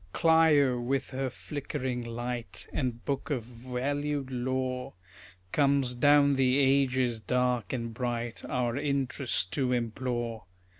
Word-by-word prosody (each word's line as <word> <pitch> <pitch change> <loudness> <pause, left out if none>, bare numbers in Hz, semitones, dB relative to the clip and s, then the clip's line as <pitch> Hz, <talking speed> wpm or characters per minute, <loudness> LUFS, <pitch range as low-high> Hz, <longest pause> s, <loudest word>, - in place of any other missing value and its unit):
Clio, 155 -6 +4
with 130 +2 -1
her 130 0 -2
flickering 130 -2 -4
light 120 0 -5
And 125 -5 -2
book 140 +2 -2
of 130 -6 -1
valued 130 +4 -3
lore, 130 +1 -2 0.6
Comes 140 -3 +2
down 145 +2 +5
the 130 -1 +3
ages, 130 -3 +2
dark 125 -4 0
and 115 -3 -3
bright, 120 -1 -3
Our 125 -1 -1
interest 140 -7 0
to 130 -3 0
implore. 120 -1 -2
130 Hz, 115 wpm, -29 LUFS, 120-140 Hz, 0.6 s, down